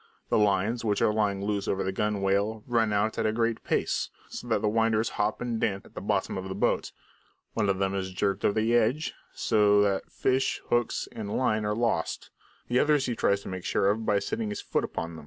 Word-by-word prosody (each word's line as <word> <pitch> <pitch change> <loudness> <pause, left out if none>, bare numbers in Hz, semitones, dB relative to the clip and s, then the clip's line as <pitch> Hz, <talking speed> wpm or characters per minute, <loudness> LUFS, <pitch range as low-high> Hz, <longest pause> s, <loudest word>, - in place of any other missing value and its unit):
The - - +3
lines, 105 +3 +2
which 105 -2 +1
are 105 - +3
lying 100 -2 0
loose 100 -1 -1
over 95 - 0
the 95 - -1
gunwale, 100 +1 0
run 115 -3 +1
out 105 +2 0
at 110 - +2
a - - +2
great 115 0 0
pace, - - 0 0.2
so - - -7
that 110 -2 0
the - - +3
winders 110 0 +2
hop 105 +1 -1
and 120 -2 -2
dance 95 -1 0
about - - -16
at - - -29
the - - -6
bottom - - -1
of 95 0 -6
the 95 - -4
boat. - - 0 0.6
One 105 -3 +1
of 95 - +1
them 95 0 0
is 95 -1 -3
jerked 100 +1 -1
over 105 - +2
the 115 +2 +1
edge, 120 +7 +1 0.2
so 105 -2 +3
that 100 -1 -1
fish, 130 0 +1
hooks, 120 -1 +1
and 105 -2 -4
line 110 -4 +1
are 105 0 0
lost; 115 -8 -1 0.4
the 125 +1 +2
other 150 +2 +4
he 130 -4 -1
tries 100 -2 +1
to - - -10
make 95 -1 -5
sure 100 - +2
of 110 +2 -2
by 105 -2 +2
setting 105 +2 -2
his 105 - -4
foot - - -1
upon 85 0 -4
it. - - -8
105 Hz, 230 wpm, -28 LUFS, 100-115 Hz, 0.6 s, other